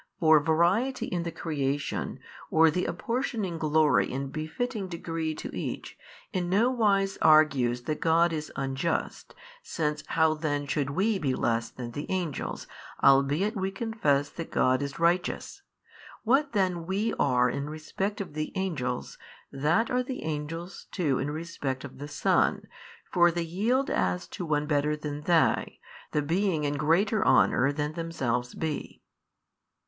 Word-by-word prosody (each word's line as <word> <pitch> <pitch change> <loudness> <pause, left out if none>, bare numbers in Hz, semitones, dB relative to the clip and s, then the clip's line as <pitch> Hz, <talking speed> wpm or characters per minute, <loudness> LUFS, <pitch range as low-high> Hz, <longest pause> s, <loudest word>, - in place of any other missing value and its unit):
For 160 -3 +6
variety 170 - +2
in 175 - -2
the 170 0 -3
creation, 145 -4 -2 0.3
or 160 0 +5
the 180 +3 -1
apportioning 210 -1 -2
glory 155 -3 +3
in 135 +1 -3
befitting 195 - -3
degree 165 -2 -3
to - - -7
each, - - -5 0.4
in 180 -2 -1
no 220 +7 +3
wise 200 -5 +1
argues 135 -6 +4
that 150 +4 -3
God 165 +1 +3
is 155 -1 -4
unjust, 135 +4 -2 0.3
since 150 - -2
how 160 -1 +3
then 145 -2 -2
should 140 -1 -1
WE 195 +7 +1
be 135 -5 0
less 115 0 0
than 120 -1 -7
the 145 +5 -5
angels, 175 -6 -3 0.4
albeit 140 - +4
we 190 -1 -1
confess 195 -10 0
that 165 - -7
God 130 +1 +2
is 140 -1 -4
Righteous? 175 - 0 0.6
What 270 +4 +2
then 180 -5 0
we 205 +4 0
are 125 -2 +3
in 140 +4 -3
respect 175 +6 -4
of 195 -7 -5
the 155 0 -3
angels, 140 -11 -3 0.3
that 155 - +1
are 250 0 +2
the 255 0 -5
angels 160 +3 -5
too 150 -8 0
in 140 - -2
respect 145 -4 -4
of 140 -2 -10
the 145 - -6
Son; 145 - +1 0.5
for 175 -1 +5
they 170 0 -2
yield 220 +11 0
as 90 -1 0
to 175 - -6
one 150 -1 +1
better 150 0 +1
than 150 -1 -5
they, 165 +1 +2 0.3
the 150 - 0
being 170 0 0
in 145 0 0
greater 175 +8 +2
honour 135 +2 +4
than 150 +1 -2
themselves 130 -8 -2
be." 160 -2 -4
160 Hz, 150 wpm, -28 LUFS, 145-185 Hz, 0.6 s, For